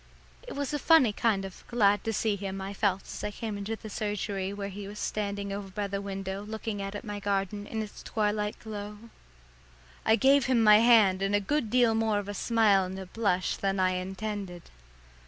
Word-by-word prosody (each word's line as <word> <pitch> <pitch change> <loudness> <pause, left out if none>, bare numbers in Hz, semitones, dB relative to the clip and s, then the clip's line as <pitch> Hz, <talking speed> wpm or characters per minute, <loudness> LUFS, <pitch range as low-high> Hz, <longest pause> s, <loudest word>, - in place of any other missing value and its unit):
It - - -6
was 285 0 -3
a 295 - 0
funny 300 -7 +5
glad 205 0 +1
to 225 - 0
see 215 0 0
him 195 -1 -5
I 195 +1 -5
felt 195 -1 0
as - - -8
I 210 - -1
came 215 0 -5
into 200 +2 -3
the 220 - -10
surgery 205 -2 -3
where 200 0 -5
he 200 0 -7
was 205 +1 -9
standing 200 -2 -3
over 200 -1 -5
by 205 +2 -3
the 200 0 -3
window 195 0 -4
looking 215 0 -5
out 195 +1 -5
at 205 - -5
my 205 -2 -5
garden 200 0 -2
in 220 -1 -3
its 210 - -10
twilight 210 -1 -1
glow. 210 -1 -7 1.1
I 220 - +5
gave 270 +2 +4
him 245 -3 +3
my 210 -1 +8
hand 220 -5 +5
and 195 +1 +1
a - - +4
good 230 +4 -1
deal 240 -1 +4
more 220 -1 +1
of 205 -1 -3
a 205 - -4
smile 210 -2 +3
and 185 +1 -6
a 190 - -6
blush 185 -2 0
than 195 -1 -1
I 185 0 +3
intended. 190 -1 -5
205 Hz, 205 wpm, -29 LUFS, 195-220 Hz, 1.1 s, my